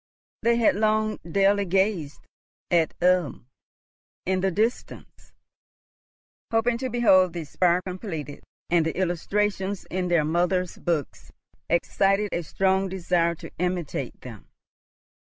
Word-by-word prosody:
They 235 Hz, 0 st, +3 dB
had 230 Hz, -3 st, +3 dB
long 215 Hz, 0 st, +1 dB
daily 195 Hz, +4 st, +1 dB
gazed 190 Hz, -5 st, 0 dB, 0.5 s
at 170 Hz, -2 st, +2 dB
Ulm 180 Hz, -9 st, +2 dB, 0.8 s
in 185 Hz, 0 st, 0 dB
the 195 Hz, -, +2 dB
distance, 220 Hz, +7 st, -3 dB, 1.2 s
hoping 230 Hz, +1 st, +1 dB
to 260 Hz, 0 st, -3 dB
behold 190 Hz, -7 st, +4 dB
the 170 Hz, -2 st, -4 dB
spire 175 Hz, +4 st, +1 dB
completed; 180 Hz, -6 st, -6 dB, 0.3 s
and 170 Hz, -1 st, +4 dB
the 160 Hz, +1 st, -3 dB
illustrations 195 Hz, +2 st, -1 dB
in 185 Hz, 0 st, -1 dB
their 170 Hz, -4 st, +2 dB
mother's 180 Hz, +3 st, 0 dB
books 165 Hz, -6 st, -3 dB, 0.4 s
excited 195 Hz, +4 st, +1 dB
a 175 Hz, -, -1 dB
strong 190 Hz, +3 st, 0 dB
desire 170 Hz, -2 st, 0 dB
to -, -, -11 dB
imitate 175 Hz, -8 st, -3 dB
them. 115 Hz, -5 st, -11 dB
185 Hz, 120 wpm, -25 LUFS, 170-200 Hz, 1.2 s, behold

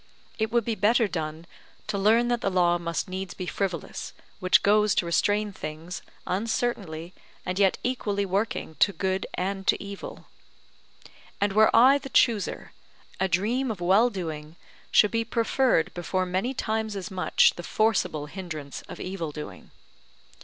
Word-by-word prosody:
It 220 Hz, 0 st, +1 dB
would 235 Hz, -2 st, +2 dB
be 230 Hz, -, 0 dB
better 220 Hz, +3 st, +3 dB
done, 160 Hz, -2 st, -4 dB, 0.4 s
to -, -, -3 dB
learn 220 Hz, +4 st, +3 dB
that 240 Hz, -1 st, 0 dB
the 195 Hz, -, +1 dB
law 175 Hz, -2 st, +2 dB
must 170 Hz, -1 st, -3 dB
needs 185 Hz, 0 st, -5 dB
be 180 Hz, -, -5 dB
frivolous, 180 Hz, -3 st, -4 dB, 0.3 s
which 185 Hz, 0 st, +4 dB
goes 210 Hz, 0 st, +4 dB
to -, -, +1 dB
restrain 205 Hz, +4 st, +1 dB
things, 165 Hz, +2 st, -7 dB, 0.2 s
uncertainly 190 Hz, -5 st, -2 dB, 0.3 s
and 180 Hz, +2 st, -2 dB
yet 195 Hz, -2 st, +4 dB
equally 205 Hz, -5 st, -1 dB
working 195 Hz, -3 st, -2 dB
to 200 Hz, -, +4 dB
good 190 Hz, +2 st, -1 dB
and 195 Hz, +1 st, -3 dB
to -, -, +3 dB
evil. 200 Hz, 0 st, -8 dB, 1.1 s
And 200 Hz, -1 st, +1 dB
were 215 Hz, +1 st, +6 dB
I 260 Hz, +5 st, +7 dB
the 270 Hz, -, -9 dB
chooser, 225 Hz, -6 st, +1 dB, 0.5 s
a 190 Hz, -, +2 dB
dream 220 Hz, +9 st, 0 dB
of 215 Hz, -5 st, -4 dB
well 195 Hz, +7 st, +4 dB
doing 160 Hz, -6 st, -6 dB, 0.3 s
should 210 Hz, -, +5 dB
be 230 Hz, 0 st, +1 dB
preferred 230 Hz, -4 st, +1 dB
before 185 Hz, +1 st, -1 dB
many 190 Hz, +9 st, -1 dB
times 220 Hz, -2 st, -2 dB
as 195 Hz, +1 st, -5 dB
much 185 Hz, -1 st, +3 dB
the -, -, -6 dB
forcible 195 Hz, -6 st, 0 dB
hindrance 155 Hz, -4 st, -7 dB
of -, -, -8 dB
evil 180 Hz, -4 st, -4 dB
doing. 150 Hz, 0 st, -9 dB
195 Hz, 155 wpm, -26 LUFS, 175-220 Hz, 1.1 s, I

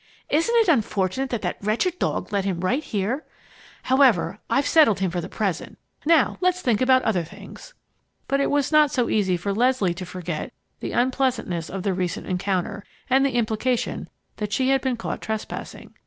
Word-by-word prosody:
Isn't 330 Hz, +11 st, +2 dB
it 455 Hz, -3 st, +4 dB
unfortunate 225 Hz, -, +1 dB
that 235 Hz, -4 st, -3 dB
that -, -, -2 dB
wretched 240 Hz, -, 0 dB
dog -, -, -2 dB
led 200 Hz, -1 st, +1 dB
him 185 Hz, -3 st, -2 dB
right 250 Hz, +11 st, 0 dB
here! 220 Hz, +8 st, -2 dB, 0.6 s
However, 245 Hz, -8 st, +3 dB
I've 275 Hz, +1 st, +2 dB
settled 295 Hz, -, +5 dB
him 190 Hz, -2 st, 0 dB
for 175 Hz, 0 st, -2 dB
the 180 Hz, -, -7 dB
present, 195 Hz, -6 st, -3 dB, 0.2 s
and -, -, -11 dB
now 325 Hz, -5 st, +4 dB
let's 365 Hz, 0 st, +2 dB
think 240 Hz, -, +1 dB
about 255 Hz, 0 st, +4 dB
other 185 Hz, -6 st, +1 dB
things." -, -, -12 dB, 0.5 s
But 275 Hz, -, +1 dB
it -, -, +1 dB
was 285 Hz, 0 st, +1 dB
not 305 Hz, -1 st, +5 dB
so 245 Hz, -3 st, 0 dB
easy 190 Hz, -4 st, +1 dB
for 200 Hz, +3 st, -2 dB
Leslie 235 Hz, -5 st, +2 dB
to 180 Hz, +2 st, -7 dB
forget 180 Hz, -3 st, -5 dB, 0.3 s
the -, -, -5 dB
unpleasantness 245 Hz, -9 st, 0 dB
of 190 Hz, 0 st, -5 dB
the 195 Hz, -, +1 dB
recent 180 Hz, +1 st, -3 dB
encounter 185 Hz, +1 st, -2 dB, 0.3 s
and 265 Hz, +1 st, +5 dB
the 275 Hz, -3 st, 0 dB
implication 235 Hz, +1 st, -1 dB, 0.3 s
that 210 Hz, -1 st, -3 dB
she 260 Hz, +5 st, +1 dB
had 270 Hz, -1 st, +3 dB
been 255 Hz, -2 st, -1 dB
caught 230 Hz, -, -4 dB
trespassing. 220 Hz, -1 st, -6 dB
225 Hz, 185 wpm, -24 LUFS, 190-270 Hz, 0.6 s, settled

